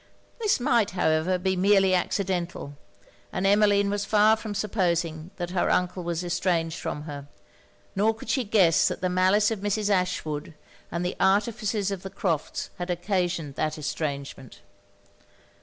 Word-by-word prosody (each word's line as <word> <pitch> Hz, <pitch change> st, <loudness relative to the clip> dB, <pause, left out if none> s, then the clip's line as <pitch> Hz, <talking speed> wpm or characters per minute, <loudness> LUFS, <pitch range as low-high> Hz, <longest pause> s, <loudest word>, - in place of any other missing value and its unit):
This 430 Hz, -, +2 dB
might, 235 Hz, -4 st, +2 dB
however, 160 Hz, +2 st, +2 dB
be 190 Hz, +1 st, 0 dB
merely 195 Hz, 0 st, +4 dB
accidental; 180 Hz, -5 st, -2 dB, 0.6 s
and 190 Hz, -, -2 dB
Emmeline 200 Hz, 0 st, +4 dB
was 205 Hz, 0 st, -1 dB
far 215 Hz, +1 st, +4 dB
from 215 Hz, -2 st, -6 dB
supposing 175 Hz, -6 st, -1 dB
that 175 Hz, -1 st, -5 dB
her 185 Hz, -, +1 dB
uncle 180 Hz, 0 st, 0 dB
was 170 Hz, 0 st, -2 dB
estranged 170 Hz, -2 st, -1 dB
from 150 Hz, -, -4 dB
her; 145 Hz, -2 st, -8 dB, 0.7 s
nor 215 Hz, +3 st, +2 dB
could 220 Hz, -, -11 dB
she 255 Hz, +3 st, +1 dB
guess 195 Hz, -7 st, +4 dB
that -, -, -3 dB
the 185 Hz, -, 0 dB
malice 190 Hz, +4 st, +3 dB
of 220 Hz, -, -2 dB
Mrs. 205 Hz, +1 st, -1 dB
Ashwood, 165 Hz, -5 st, -1 dB, 0.4 s
and 170 Hz, +1 st, -2 dB
the 180 Hz, -, -2 dB
artifices 205 Hz, 0 st, +1 dB
of 195 Hz, -2 st, -4 dB
the 195 Hz, -, -7 dB
Crofts', 175 Hz, -5 st, -2 dB
had 175 Hz, +1 st, -4 dB
occasioned 175 Hz, -4 st, -1 dB
that 155 Hz, 0 st, -1 dB
estrangement. 140 Hz, -3 st, -5 dB
185 Hz, 150 wpm, -26 LUFS, 170-205 Hz, 0.7 s, merely